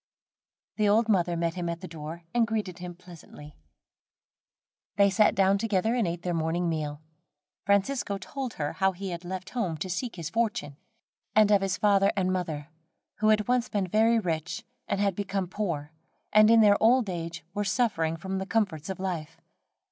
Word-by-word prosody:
The 210 Hz, -1 st, +3 dB
old 225 Hz, +2 st, +3 dB
mother 175 Hz, -4 st, +2 dB
met 165 Hz, 0 st, 0 dB
him 175 Hz, -2 st, -3 dB
at 170 Hz, +1 st, -4 dB
the 185 Hz, -, -6 dB
door, 160 Hz, +1 st, -8 dB
and 235 Hz, -2 st, +3 dB
greeted 210 Hz, -6 st, -3 dB
him 175 Hz, -1 st, -7 dB
pleasantly. 170 Hz, -4 st, -13 dB, 1.4 s
They 200 Hz, -1 st, +4 dB
sat 210 Hz, +2 st, +4 dB
down 195 Hz, 0 st, +3 dB
together 220 Hz, 0 st, +1 dB
and 240 Hz, -6 st, +1 dB
ate 170 Hz, 0 st, -4 dB
their 180 Hz, -, -1 dB
morning 165 Hz, +2 st, 0 dB
meal. 155 Hz, -2 st, -3 dB, 0.6 s
Francisco 200 Hz, +1 st, +1 dB
told 255 Hz, +6 st, -5 dB
her 145 Hz, -1 st, -3 dB
how 190 Hz, +2 st, +1 dB
he 190 Hz, +1 st, -5 dB
had 170 Hz, 0 st, -6 dB
left 185 Hz, +1 st, -6 dB
home 190 Hz, -10 st, -2 dB
to 185 Hz, +4 st, -4 dB
seek 230 Hz, +7 st, -3 dB
his 165 Hz, -2 st, -5 dB
fortune, 225 Hz, -10 st, -1 dB, 0.6 s
and 215 Hz, -1 st, +5 dB
of 200 Hz, -1 st, +5 dB
his 190 Hz, -1 st, -1 dB
father 200 Hz, -1 st, +4 dB
and 185 Hz, -2 st, +1 dB
mother, 160 Hz, -5 st, -3 dB, 0.5 s
who 215 Hz, -, +1 dB
had 215 Hz, -1 st, +3 dB
once 250 Hz, -1 st, +1 dB
been 200 Hz, -2 st, 0 dB
very 220 Hz, +5 st, +3 dB
rich, 165 Hz, -5 st, -2 dB, 0.2 s
and 200 Hz, -, -1 dB
had 200 Hz, -2 st, +1 dB
become 195 Hz, -1 st, -2 dB
poor, 170 Hz, -7 st, -3 dB, 0.4 s
and 215 Hz, 0 st, +7 dB
in 230 Hz, 0 st, +7 dB
their 205 Hz, -1 st, +5 dB
old 240 Hz, +1 st, +4 dB
age 170 Hz, -2 st, -5 dB
were 205 Hz, 0 st, -1 dB
suffering 190 Hz, -7 st, 0 dB
for 190 Hz, +3 st, -5 dB
the 190 Hz, -, -4 dB
comforts 195 Hz, -8 st, -1 dB
of 190 Hz, -, -4 dB
life. 175 Hz, -5 st, -4 dB
190 Hz, 185 wpm, -28 LUFS, 170-215 Hz, 1.4 s, and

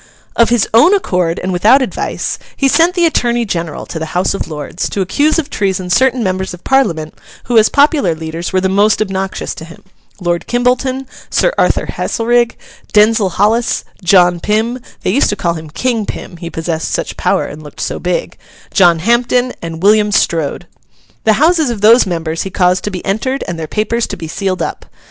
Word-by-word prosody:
Of 230 Hz, -, +4 dB
his 240 Hz, -3 st, +2 dB
own 320 Hz, -, +6 dB
accord 180 Hz, -, 0 dB
and 185 Hz, 0 st, -1 dB
without 220 Hz, +10 st, +4 dB
advice, -, -, -3 dB, 0.2 s
he 275 Hz, -, +2 dB
sent 335 Hz, +6 st, +3 dB
the 350 Hz, -2 st, +3 dB
Attorney 240 Hz, -6 st, +1 dB
General 170 Hz, -6 st, -4 dB
to 160 Hz, -, -6 dB
the 160 Hz, -, -4 dB
House 185 Hz, -, +1 dB
of 195 Hz, -, -4 dB
Lords, 155 Hz, +3 st, -4 dB
to 200 Hz, -, -2 dB
accuse 290 Hz, -, +1 dB
of 320 Hz, -4 st, -1 dB
treason 190 Hz, -2 st, -1 dB
certain 255 Hz, +4 st, +2 dB
members 190 Hz, -1 st, -2 dB
of 180 Hz, -, -20 dB
Parliament 170 Hz, -13 st, +1 dB, 0.3 s
who 240 Hz, -, -2 dB
as 215 Hz, -, +4 dB
popular 285 Hz, -, +3 dB
leaders 160 Hz, +2 st, -5 dB
were 185 Hz, -, +2 dB
the 190 Hz, -, +1 dB
most 205 Hz, +3 st, +2 dB
obnoxious 195 Hz, -2 st, -3 dB
to -, -, -9 dB
him; 165 Hz, +1 st, -13 dB, 0.4 s
Lord 175 Hz, -2 st, -2 dB
Kimbolton, 255 Hz, +2 st, 0 dB, 0.2 s
Sir -, -, +1 dB
Arthur -, -, +1 dB
Haselrig, 235 Hz, +1 st, 0 dB, 0.4 s
Denzil 210 Hz, -1 st, +4 dB
Hollis, 225 Hz, +5 st, +1 dB, 0.2 s
John 175 Hz, -1 st, +4 dB
Pym 220 Hz, +6 st, -1 dB, 0.2 s
(they -, -, +1 dB
used 265 Hz, +8 st, +2 dB
to 205 Hz, -, 0 dB
call 170 Hz, -4 st, -1 dB
him 160 Hz, -2 st, -8 dB
King 230 Hz, +5 st, -1 dB
Pym, 175 Hz, -, -7 dB
he 170 Hz, 0 st, -7 dB
possessed 165 Hz, -1 st, -3 dB
such -, -, -3 dB
power -, -, 0 dB
and 155 Hz, -, -8 dB
looked 150 Hz, -2 st, -13 dB
so -, -, -3 dB
big), 180 Hz, 0 st, -3 dB, 0.3 s
John 175 Hz, -3 st, +5 dB
Hampden, 240 Hz, +6 st, +1 dB
and 165 Hz, 0 st, -6 dB
William 210 Hz, 0 st, +4 dB
Strode. 165 Hz, -7 st, 0 dB, 0.6 s
The 220 Hz, -, +5 dB
houses 315 Hz, +3 st, +3 dB
of 230 Hz, -4 st, -4 dB
those 225 Hz, +1 st, +6 dB
members 165 Hz, -2 st, -3 dB
he 195 Hz, -, -4 dB
caused 180 Hz, -1 st, +1 dB
to -, -, -1 dB
be 185 Hz, -3 st, -6 dB
entered, 260 Hz, +8 st, -1 dB
and 170 Hz, -1 st, -4 dB
their 160 Hz, -, -4 dB
papers 220 Hz, +5 st, -1 dB
to 200 Hz, -, -6 dB
be 165 Hz, -2 st, -6 dB
sealed 190 Hz, +2 st, -2 dB
up. -, -, -6 dB
200 Hz, 195 wpm, -14 LUFS, 175-240 Hz, 0.6 s, own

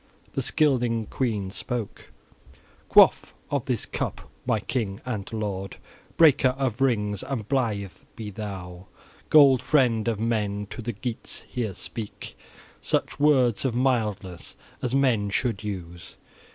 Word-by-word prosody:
The -, -, -1 dB
Scylding 120 Hz, -7 st, +1 dB
queen 105 Hz, -7 st, -1 dB
spoke: 120 Hz, +1 st, -5 dB, 0.8 s
"Quaff -, -, +5 dB, 0.2 s
of -, -, 0 dB
this -, -, -1 dB
cup, -, -, -4 dB, 0.2 s
my 110 Hz, -, +2 dB
king 105 Hz, -3 st, -3 dB
and 110 Hz, -6 st, -4 dB
lord, 100 Hz, -4 st, -4 dB, 0.4 s
breaker 135 Hz, -5 st, +5 dB
of 130 Hz, -3 st, -1 dB
rings, 105 Hz, -6 st, +1 dB
and 115 Hz, -7 st, -4 dB
blithe 110 Hz, -8 st, 0 dB, 0.2 s
be 110 Hz, -3 st, -6 dB
thou, 95 Hz, -3 st, -7 dB, 0.4 s
gold 140 Hz, -5 st, +7 dB
friend 125 Hz, -5 st, +2 dB
of 115 Hz, -3 st, 0 dB
men; 105 Hz, -3 st, -1 dB
to -, -, -6 dB
the 120 Hz, +1 st, -3 dB
Geats 110 Hz, +3 st, -5 dB
here 110 Hz, -6 st, -3 dB
speak 110 Hz, -3 st, -7 dB, 0.5 s
such -, -, -1 dB
words 130 Hz, -6 st, +3 dB
of 130 Hz, -4 st, 0 dB
mildness 105 Hz, -8 st, -1 dB, 0.3 s
as 125 Hz, +1 st, -1 dB
man 120 Hz, -7 st, +2 dB
should 110 Hz, 0 st, -1 dB
use. 90 Hz, -4 st, -7 dB
110 Hz, 130 wpm, -26 LUFS, 100-125 Hz, 0.8 s, gold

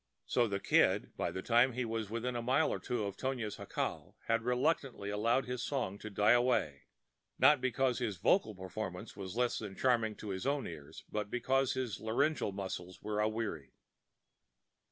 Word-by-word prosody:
So 120 Hz, -1 st, +2 dB
the 100 Hz, -2 st, -2 dB
Kid, -, -, +3 dB
by -, -, -1 dB
the 95 Hz, -, -5 dB
time 120 Hz, +2 st, +4 dB
he 125 Hz, +1 st, -1 dB
was 115 Hz, -2 st, -3 dB
within 120 Hz, +3 st, -2 dB
a 120 Hz, -, -1 dB
mile 130 Hz, +6 st, +2 dB
or -, -, -3 dB
two 120 Hz, -3 st, -2 dB
of 100 Hz, -1 st, -4 dB
Tonia's 125 Hz, -5 st, -3 dB
jacal, -, -, -4 dB
had 115 Hz, 0 st, +2 dB
reluctantly 125 Hz, -3 st, 0 dB
allowed 115 Hz, +5 st, +2 dB
his 125 Hz, -1 st, -3 dB
song 120 Hz, -8 st, -2 dB
to 110 Hz, -, -7 dB
die 105 Hz, +1 st, +3 dB
away—not 120 Hz, -, +1 dB
because 130 Hz, 0 st, +1 dB
his 110 Hz, -6 st, -2 dB
vocal 110 Hz, -, +2 dB
performance 95 Hz, +2 st, -5 dB
had 100 Hz, -, -10 dB
become 95 Hz, +3 st, -6 dB
less 125 Hz, -2 st, +1 dB, 0.2 s
charming 115 Hz, -4 st, +2 dB
to 105 Hz, -, -8 dB
his 95 Hz, +6 st, -3 dB
own 140 Hz, -1 st, 0 dB
ears, 75 Hz, -4 st, -9 dB
but 105 Hz, -1 st, -2 dB
because 130 Hz, +3 st, +1 dB
his 125 Hz, -6 st, -3 dB
laryngeal 120 Hz, +2 st, +1 dB
muscles 95 Hz, -2 st, -5 dB
were 105 Hz, 0 st, -2 dB
aweary. 105 Hz, -, -2 dB
115 Hz, 175 wpm, -34 LUFS, 100-125 Hz, 0.2 s, time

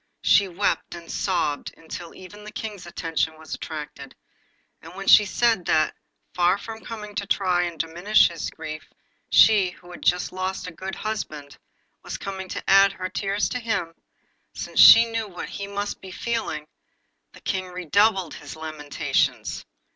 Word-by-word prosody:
She 200 Hz, -, +5 dB
wept 185 Hz, 0 st, -1 dB
and 170 Hz, -1 st, -10 dB
sobbed 160 Hz, -6 st, -1 dB
until 165 Hz, +1 st, -9 dB
even 205 Hz, +3 st, -12 dB
the 210 Hz, -, -9 dB
King's 205 Hz, -5 st, -7 dB
attention 165 Hz, -2 st, -2 dB
was 160 Hz, -1 st, -9 dB
attracted; 155 Hz, -2 st, -7 dB, 0.7 s
and 165 Hz, +3 st, -12 dB
when 195 Hz, +1 st, -6 dB
she 210 Hz, -, +8 dB
said 225 Hz, -2 st, +1 dB
that, 155 Hz, -, +2 dB, 0.4 s
far 180 Hz, +2 st, +3 dB
from 220 Hz, +2 st, -9 dB
coming 210 Hz, -2 st, -7 dB
to 200 Hz, -1 st, -3 dB
try 180 Hz, -3 st, +2 dB
and 170 Hz, -2 st, -6 dB
diminish 175 Hz, +7 st, +3 dB
his 170 Hz, -2 st, -5 dB
grief, 155 Hz, 0 st, -8 dB, 0.4 s
she, 205 Hz, -4 st, +6 dB
who 180 Hz, 0 st, -15 dB
had 175 Hz, -, -10 dB
just 180 Hz, 0 st, +1 dB
lost 185 Hz, +1 st, -3 dB
a 180 Hz, -, -6 dB
good 190 Hz, +4 st, -6 dB
husband, 155 Hz, -10 st, -5 dB, 0.4 s
was -, -, -6 dB
come 190 Hz, -1 st, -6 dB
to -, -, -6 dB
add 195 Hz, 0 st, +6 dB
her 185 Hz, -1 st, -5 dB
tears 200 Hz, +2 st, -1 dB
to 250 Hz, -, -3 dB
his, 200 Hz, -8 st, -2 dB, 0.6 s
since -, -, -4 dB
she 230 Hz, -, +10 dB
knew 225 Hz, -1 st, -3 dB
what 180 Hz, -3 st, -7 dB
he 200 Hz, -1 st, -6 dB
must 205 Hz, 0 st, -4 dB
be 190 Hz, -, -10 dB
feeling, 185 Hz, -6 st, -3 dB, 0.7 s
the -, -, -15 dB
King 185 Hz, -1 st, -2 dB
redoubled 185 Hz, +1 st, +1 dB
his -, -, -9 dB
lamentations. 155 Hz, -2 st, -2 dB
185 Hz, 160 wpm, -24 LUFS, 165-205 Hz, 0.7 s, she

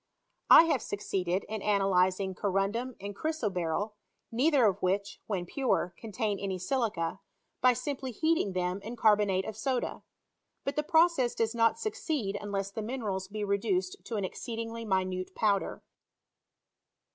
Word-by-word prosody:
I -, -, +11 dB
have 315 Hz, -7 st, +1 dB
succeeded 190 Hz, -2 st, -2 dB
in 215 Hz, -1 st, -5 dB
ansdyzing 190 Hz, -2 st, +2 dB
corundum 205 Hz, +6 st, -1 dB
and 200 Hz, +1 st, -6 dB
chry«* 310 Hz, -, -1 dB
lOberjl, 195 Hz, -1 st, -1 dB, 0.4 s
neither 265 Hz, +2 st, +4 dB
of 200 Hz, -1 st, +2 dB
which, 200 Hz, +2 st, -1 dB
when 190 Hz, -5 st, -2 dB
pure, 180 Hz, -5 st, 0 dB
contain 215 Hz, -2 st, -2 dB
any 195 Hz, -2 st, -2 dB
ailica, 190 Hz, -5 st, -1 dB, 0.4 s
by 255 Hz, 0 st, +6 dB
simply 270 Hz, +2 st, -4 dB
heating 315 Hz, -, +1 dB
them 180 Hz, +1 st, -1 dB
in 225 Hz, +4 st, -6 dB
carbonate 210 Hz, -4 st, +3 dB
of 220 Hz, -, -5 dB
soda; 250 Hz, +3 st, -2 dB, 0.6 s
but 275 Hz, -, -2 dB
the 300 Hz, -, +2 dB
process 320 Hz, -5 st, +3 dB
does 225 Hz, 0 st, 0 dB
not 230 Hz, -1 st, +3 dB
succeed 310 Hz, -, -2 dB
unless 200 Hz, -1 st, -3 dB
the 220 Hz, -, -4 dB
minerals 210 Hz, -5 st, -3 dB
be 210 Hz, +1 st, -4 dB
reduced 360 Hz, -, 0 dB
to 230 Hz, -, -4 dB
an 200 Hz, -2 st, 0 dB
exceedingly 230 Hz, +2 st, -5 dB
minute 185 Hz, -2 st, -1 dB
powder. 205 Hz, -3 st, 0 dB
210 Hz, 145 wpm, -30 LUFS, 195-245 Hz, 0.6 s, I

